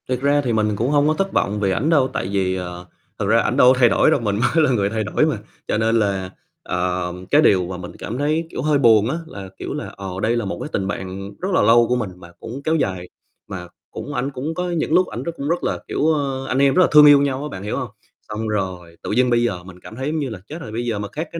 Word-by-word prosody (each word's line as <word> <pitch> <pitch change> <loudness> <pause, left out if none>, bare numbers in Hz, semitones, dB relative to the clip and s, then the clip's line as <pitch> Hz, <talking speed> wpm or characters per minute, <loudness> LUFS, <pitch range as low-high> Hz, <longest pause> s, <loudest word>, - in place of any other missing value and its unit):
Thật 125 -1 0
ra 145 +1 +3
thì 125 -4 -1
mình 105 -1 +1
cũng 115 +5 -1
hông 145 0 +3
có 155 - +3
thất 195 +4 -2
vọng 105 +1 0
vì 100 -2 +1
ảnh 130 +11 0
đâu, 145 -6 +4
tại - - -2
vì, 95 -2 0
ờ, 90 -1 -6 0.3
thật - - -1
ra - - +4
ảnh - - -1
đâu 125 +1 +7
có 125 - -3
thay 120 -2 +6
đổi - - +3
đâu, 150 - +3
mình 105 -3 0
mới 140 +9 +2
là 135 - +1
người 100 -5 +1
thay 110 0 -2
đổi - - +1
mà, - - 0 0.3
cho - - 0
nên 115 +1 +2
là, 95 -3 -1 0.3
ờ, 90 0 -2 0.2
cái 150 - +6
điều 95 - +3
mà 90 0 -5
mình 90 0 -8
cảm 115 - -5
thấy, 155 +4 0
kiểu, - - -5
hơi 150 +1 +2
buồn 115 -4 +5
á 155 - -1
là, 100 -9 -9
kiểu - - -5
là, - - -5
ờ, 95 -1 -6
đây 110 +3 +1
là 120 - -2
một 95 -3 -4
cái - - -5
tình 95 - -1
bạn 95 0 -5
rất 185 - -2
là - - +4
lâu 115 +2 +5
của 125 - +1
mình 115 -5 -2
mà 85 -1 -14
cũng 125 +5 -7
kéo 160 +2 +1
dài, 95 - -2 0.4
mà 90 -2 -7 0.2
cũng 145 - -7
ảnh 135 +2 -2
cũng 140 +4 -4
có 180 +2 -3
những 165 -2 -1
lúc 180 +1 +4
ảnh - - -6
rất 170 - -3
cũng 140 +2 -3
rất 175 +1 0
là, - - -1
kiểu, 150 - 0
ờ, 135 -3 -2
anh 130 - -1
em 140 -1 +4
rất 185 - +4
là 180 - +5
thương 150 0 +9
yêu 145 -1 +8
nhau 140 -1 -1
á, 150 - -4
bạn 95 -7 -7
hiểu 105 - -3
hông? - - -4 0.4
Xong 110 +1 -3
rồi 90 -5 -4
tự - - -4
nhiên 125 +3 +3
bây 120 -1 +3
giờ 95 -7 -2
mình 90 0 -13
cảm 110 - -11
thấy, 130 +3 -4
giống 155 +1 -1
như 140 -3 -2
là, 110 -5 -7
chết 155 - -7
rồi, 110 - -8
bây 120 +2 -3
giờ 115 -4 -2
mà 105 - -4
các 155 +9 -5
cái 165 - -5
120 Hz, 300 wpm, -21 LUFS, 100-145 Hz, 0.4 s, thương